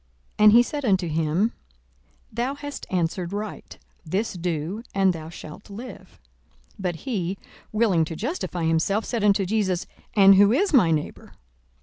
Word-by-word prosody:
42:010:028 - - +4
And 210 - +9
he 240 +1 +7
said 290 +3 -5
unto 190 -5 +2
him, 160 +7 0 0.8
Thou 245 +5 -2
hast 290 0 -7
answered 175 0 -1
right: 205 +1 -6 0.3
this 190 +8 -2
do, 175 +3 -3
and 195 -2 +3
thou 160 -1 -8
shalt 170 +3 -11
live. 230 +6 -10 0.5
42:010:029 - - -27
But 180 -3 -2
he, 195 - -3 0.3
willing 210 -7 +2
to 165 - -6
justify 220 - -3
himself, 165 +7 +1
said 235 -4 -2
unto 200 -1 +3
Jesus, 190 -3 0 0.3
And 195 -1 +8
who 200 +1 +6
is 330 - +1
my 225 - +5
neighbour? 155 -2 -3
195 Hz, 155 wpm, -24 LUFS, 170-220 Hz, 0.8 s, And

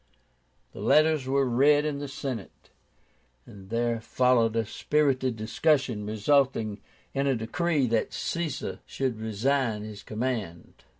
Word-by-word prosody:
The - - -11
letters 155 -3 +3
were 135 0 +2
read 145 +5 +4
in 145 -2 -2
the 145 - -5
Senate, 130 -6 -7 0.7
and 95 -2 -13
there 115 0 0
followed 120 -1 +2
a 115 -1 +1
spirited 130 0 0
discussion, 115 -1 +1
resulting 110 -2 +1 0.3
in 140 0 0
a 135 - +2
decree 140 +6 0
that 115 -2 0
Caesar 165 -4 -3
should 130 -5 -2
resign 110 0 0
his 105 -1 -8
command. 110 -7 -4
125 Hz, 125 wpm, -27 LUFS, 110-140 Hz, 0.7 s, read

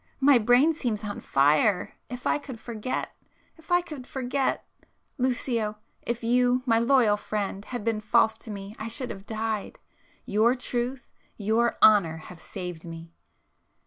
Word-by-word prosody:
My 275 -2 +6
brain 245 +8 +4
seems 235 -8 -2
on 205 -1 -4
fire! 150 +8 +2 0.2
If 250 +1 -7
I - - +2
could 260 -5 -9
forget!... 235 +1 -4 0.4
if 320 +2 -16
I 350 0 +5
could 295 -7 -9
forget! 265 -1 -1 0.5
Lucio—if 235 -2 -2
you, 245 +2 +3
my 230 -3 +3
loyal 235 -4 +4
friend, 205 -2 -3
had 245 -4 -5
been 225 -2 0
false 220 0 +3
to - - -10
me 200 0 -7
I 220 - -4
should 250 +2 -4
have 195 +1 -10
died,—your 220 +1 -2
truth, 245 0 -3 0.3
your 225 +3 +1
honour 185 -7 +6
have 165 +2 -11
saved 180 -3 -7
me!" 165 0 -9
230 Hz, 145 wpm, -27 LUFS, 210-250 Hz, 0.5 s, My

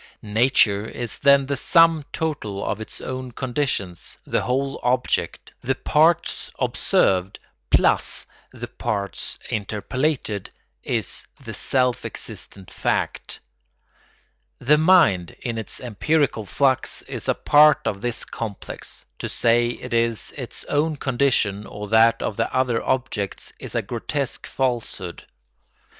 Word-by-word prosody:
Nature 110 -2 +3
is 120 0 -4
then 140 -1 +5
the 140 +1 -1
sum 165 +2 +4
total 125 -11 -3
of 105 - -2
its 110 - -8
own 130 -1 -5
conditions; 120 - -2
the - - 0
whole 135 +5 -1
object, 125 +1 -1
the 135 +2 0
parts 155 +5 +2
observed 95 +1 +1 0.3
plus - - +3 0.3
the - - -7
parts 100 -2 -3
interpolated, 110 +1 -2 0.3
is - - -1 0.2
the - - -6
self 125 -2 0
existent 95 -2 -7
fact. - - -2 1.2
The 150 +4 +3
mind, 155 - +4
in 115 -2 -3
its 110 - -3
empirical 130 0 0
flux, 130 +4 +1
is - - -5
a - - +3
part 150 0 +5
of 100 -1 -2
this 120 0 -2
complex; 110 -4 -5
to - - -4
say 120 +1 +3
it 120 - -6
is 115 -1 0
its 125 -4 -6
own 150 +2 0
condition 120 -7 0
or 105 0 -7
that 115 +1 +4
of 105 - -3
the 115 - 0
other 125 -3 +1
objects 105 -6 -2
is - - -7
a - - +1
grotesque - - -3
falsehood. 115 -8 -2
120 Hz, 125 wpm, -23 LUFS, 105-140 Hz, 1.2 s, then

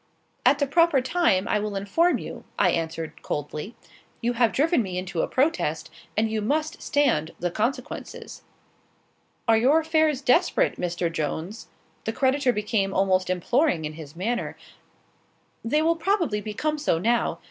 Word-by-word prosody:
"At 275 +2 +5
the 285 - +1
proper 330 0 +4
time, 255 - +1
I 210 - +1
will 210 -1 -3
inform 265 - +2
you," - - -8
I - - +4
answered, 160 -1 -4
coldly. 150 +8 -5 0.4
"You 240 +1 0
have 235 -2 +3
driven 310 - +2
me 185 -4 -4
into 180 -2 -2
a - - 0
protest, 300 +6 0 0.3
and 220 +1 +3
you 220 -1 -2
must 310 +8 -1
stand 230 - +1
the 175 0 -1
consequences." 235 +9 -4 1.1
"Are 225 -1 +5
your 275 +7 +4
affairs 315 -3 +1
desperate, 330 +8 +2
Mr. 175 -1 -1
Jones?" 165 +7 -4 0.4
The 225 - -1
creditor 265 +1 +2
became 210 -3 -1
almost 185 -1 +2
imploring 185 - +1
in 150 - -4
his 155 -1 -10
manner. 225 +8 -2 1.1
"They 300 +7 +1
will 330 +1 +2
probably 335 - 0
become 295 +9 -2
so 285 - +1
now. 230 +7 +1
230 Hz, 150 wpm, -25 LUFS, 185-290 Hz, 1.1 s, At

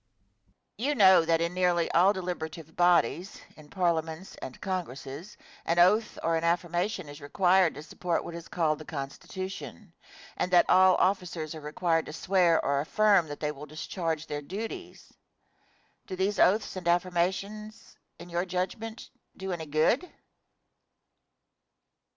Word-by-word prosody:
Question. 260 +5 0
You 295 - +1
know 190 -6 +6
that 165 0 +2
in 170 +1 -1
nearly 180 -2 +1
all 180 +4 +5
deliberative 165 -4 -5
bodies 175 0 +2 0.2
in 150 -1 -16
parliaments 170 -1 -1
and 130 - -8
congresses 170 -2 -5 0.3
an 170 - 0
oath 210 +6 +4
or 165 0 +1
an 165 - -1
affirmation 175 +2 -1
is 145 +1 -11
required 180 +3 +3
to 150 - -8
support 170 +2 -2
what 170 - -7
is 170 0 -8
called 155 -3 0
the - - -8
Constitution; 180 +6 -7 0.4
and 180 - -2
that 175 -1 +5
all 185 -1 +6
officers 180 -5 -1
are 155 - -8
required 165 +2 0
to - - -7
swear 175 -1 +3
or 140 0 +1
affirm 200 +1 +3
that 145 0 -8
they 150 -1 0
will 150 +1 -10
discharge 160 +1 -4
their 145 -1 -4
duties; 225 - -7 0.9
do 185 - -5
these 195 +3 -1
oaths 210 +2 +3
and 180 -2 -6
affirmations, 185 +5 -1 0.2
in 170 - -11
your 175 0 -1
judgment, 190 +5 -4 0.3
do 190 0 -5
any 165 -3 -4
good? 155 - +1
175 Hz, 145 wpm, -28 LUFS, 160-190 Hz, 0.9 s, know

